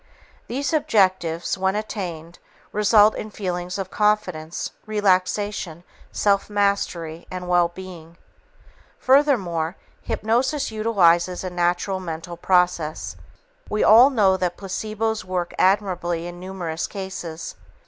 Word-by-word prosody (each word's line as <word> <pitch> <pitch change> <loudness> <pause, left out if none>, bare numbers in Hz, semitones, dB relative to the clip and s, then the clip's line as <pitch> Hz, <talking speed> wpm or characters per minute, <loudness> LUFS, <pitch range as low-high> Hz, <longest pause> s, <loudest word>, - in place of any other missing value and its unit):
These 280 +6 -2
objectives, 190 - +1
when 190 +1 +1
attained, 175 -6 -5 0.3
result 210 0 +5
in 215 - -5
feelings 180 -3 -4
of 190 -1 -5
confidence, 185 -7 -1 0.2
relaxation, 195 -3 0 0.3
self 200 0 +1
mastery 190 -5 -1
and 180 -1 -6
well 175 -1 +4
being. 170 -2 -11 0.8
Furthermore, 200 - +2 0.3
hypnosis 260 +5 0
utilizes 185 -5 +2
a 185 - -4
natural 175 +2 0
mental 170 -1 -6
process. 175 -3 0 0.5
We 210 - 0
all 235 +5 +8
know 200 -8 +3
that 180 -1 -2
placebos 215 +3 -3
work 180 -1 -3
admirably 180 -4 +1
in 175 0 -8
numerous 180 -3 -4
cases. 190 -5 -6
185 Hz, 105 wpm, -23 LUFS, 175-210 Hz, 0.8 s, all